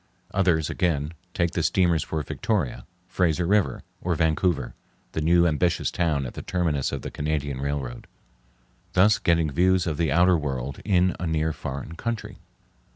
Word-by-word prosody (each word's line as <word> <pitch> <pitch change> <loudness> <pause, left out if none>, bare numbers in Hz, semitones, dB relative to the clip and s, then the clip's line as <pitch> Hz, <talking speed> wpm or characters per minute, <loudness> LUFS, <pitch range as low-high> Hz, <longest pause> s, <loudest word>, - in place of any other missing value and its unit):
Others 85 -5 +2
again 80 -4 0 0.2
take 85 -1 +1
the 85 - -1
steamers 85 -2 +2
for 80 -1 -3
Victoria, 90 - -2 0.2
Fraser 90 -2 +1
River, 100 +2 +1 0.2
or 90 -1 0
Vancouver, 80 -3 +1 0.4
the 80 - -2
new 85 +2 +4
ambitious 85 +1 +1
town 80 -6 0
at 60 - -6
the - - -6
terminus 80 -7 -1
of - - -4
the - - -5
Canadian 75 -3 -2
Railroad, 70 -4 -4 0.9
thus 100 +2 +5
getting 85 -4 +2
views 90 +4 +3
of 80 -4 -2
the 80 0 +1
outer 90 +2 +5
world 70 -2 -4
in 90 -3 +2
a 90 - -2
near 80 0 0
foreign 70 +4 -6
country. 115 +3 -4
85 Hz, 155 wpm, -25 LUFS, 75-90 Hz, 0.9 s, thus